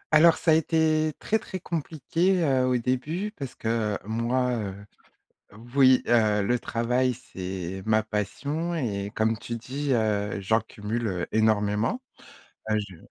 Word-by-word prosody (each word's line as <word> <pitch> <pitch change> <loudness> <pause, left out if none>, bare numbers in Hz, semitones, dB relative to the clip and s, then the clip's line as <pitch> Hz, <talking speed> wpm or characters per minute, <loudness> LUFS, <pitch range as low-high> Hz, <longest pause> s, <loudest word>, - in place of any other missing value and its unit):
Alors 165 +1 +7
ça 165 - +2
a - - +7
été 155 -1 +2
très, 220 - 0
très 185 - -7
compliqué, 170 +3 0
heu, 130 -4 +2
au 125 -1 +2
début 145 - -2
parce 135 -3 -7
que 110 -2 -1
moi, 120 +3 0
heu, 100 -3 -4 1.0
oui, 130 -2 +6
heu, 110 -3 +4
le 120 +5 +1
travail 125 +3 0
c'est 95 -5 -6
ma 110 0 +3
passion 140 - -3
et 100 -10 -2
comme 110 +1 +1
tu 115 +2 -5
dis, 135 +4 -3
heu, 105 -3 0
j'en 110 +3 +2
cumule 105 -4 -3
énormément. 110 - +2 0.7
Heu, 110 - +3
je 95 -3 -12
120 Hz, 140 wpm, -26 LUFS, 105-145 Hz, 1.0 s, Alors